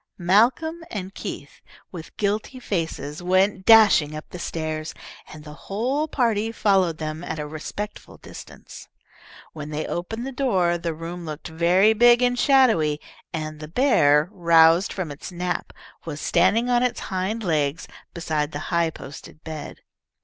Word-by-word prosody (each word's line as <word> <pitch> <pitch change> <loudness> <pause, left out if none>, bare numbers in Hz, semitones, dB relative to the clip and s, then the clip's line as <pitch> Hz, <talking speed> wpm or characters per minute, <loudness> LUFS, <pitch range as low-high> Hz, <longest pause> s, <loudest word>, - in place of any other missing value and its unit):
Malcolm 240 - +2
and 195 -2 -6
Keith, - - -8 0.3
with 165 -3 -10
guilty 215 +5 -2
faces, 165 - -4
went 190 +2 +1
dashing 200 -9 +6
up 155 - -8
the 180 - -8
stairs, 155 -2 -4 0.4
and 155 -1 -11
the 150 0 -10 0.2
whole 255 +10 -1
party 225 -6 0
followed 195 -7 +2
them 155 +1 -5
at 160 - -5
a 150 - -4
respectful 165 +7 -7
distance. - - -12 0.7
When 150 -2 -7
they 155 +1 -3
opened 225 +8 -4
the 270 - -5
door 190 -11 +1
the 165 -1 -3
room 170 +2 -7
looked 155 +2 -7
very 175 +6 +3
big 240 +2 +5
and 245 0 +1
shadowy, 225 - +3 0.3
and 155 -1 -5
the 155 - -8
bear, 155 - +3
roused 170 -1 +4
from 180 -6 -4
its 145 +6 -9
nap, 180 0 -3 0.3
was 150 -3 -6
standing 190 +11 +2
on 245 -1 +2
its 250 -1 -1
hind 195 +4 -3
legs 150 -4 -1 0.2
beside 155 -2 -2
the - - -4
high 170 -1 +2
posted 155 +1 -11
bed. 155 -2 -8
175 Hz, 150 wpm, -23 LUFS, 155-220 Hz, 0.7 s, dashing